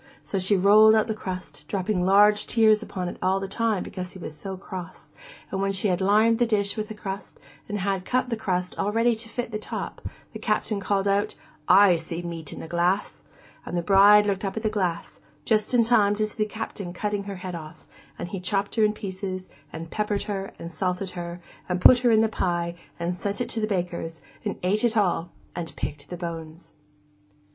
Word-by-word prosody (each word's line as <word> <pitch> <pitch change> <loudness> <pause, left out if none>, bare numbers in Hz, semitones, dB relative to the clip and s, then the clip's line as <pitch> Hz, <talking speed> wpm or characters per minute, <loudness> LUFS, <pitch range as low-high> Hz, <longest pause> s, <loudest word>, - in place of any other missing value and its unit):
So 195 - -2
she 190 +2 +3
rolled 215 +3 +7
out 220 - +3
the 220 - -2
crust, 185 -4 -7
dropping 195 -1 -1
large 205 +2 +5
tears 220 -2 +4
upon 185 -4 -4
it - - -6
all 190 +1 +2
the 195 - -4
time 220 0 0
because 185 -1 -6
he - - -9
was 155 -3 -7
so 190 +4 -6
cross, 185 -2 -8 0.4
and 195 - -1
when 195 0 +1
she 195 +2 +1
had 180 0 0
lined 215 +4 +4
the 240 - +3
dish 200 -3 +1
with 215 -1 -4
crust 195 -1 -6 0.3
and 210 - -2
had 195 -1 -1
cut 255 +4 0
the - - +1
crust 180 -4 -2
all 205 - +1
ready 230 +2 +3
to 225 +1 -6
fit 240 0 -4
the 215 - -3
top, - - -5 0.3
the - - -6
Captain 210 -3 0
called 195 0 0
out, 200 +1 +1 0.3
'I 195 -3 +7
see 165 +1 -5
the 175 - -6
meat 165 -3 -6
in - - -7
the - - -7
glass!' 175 +4 0 0.4
And 175 - -4
the 170 - -1
bride 205 +2 +7
looked 195 -1 -1
up 195 +2 -3
at 220 - -3
the 215 - +2
glass, 180 -5 -2 0.3
just 215 -2 +2
in 245 -2 +5
time 210 -3 +4
to 215 0 +1
see 215 - -8
the - - -10
Captain 205 -4 -5
cutting 205 +1 -2
her 200 -1 -5
head 185 0 -6
off; 160 -1 -9 0.3
and - - -5
he 195 - -4
chopped 195 +2 -1
her 220 - +5
in 210 0 +3
pieces, 190 -2 -5 0.2
and 165 0 -7
peppered 210 -1 -1
her, 195 -2 -4
and 170 0 -8
salted 180 +2 -2
her, 175 0 -6 0.3
and 180 0 0
put 250 +6 +8
her 245 -1 +3
in 220 -1 +5
the 225 - +4
pie, 175 -5 -1 0.3
and 175 +1 -2
sent 200 0 -2
it 245 - -2
to 225 - -3
the 215 - +1
baker's, 175 -4 -3 0.2
and - - -2
ate 205 +5 +1
it 235 -1 +2
all, 175 -4 +1 0.3
and 170 -2 -5
picked 145 -1 -5
the 175 - -5
bones. 165 -1 -7
195 Hz, 220 wpm, -25 LUFS, 180-215 Hz, 0.4 s, put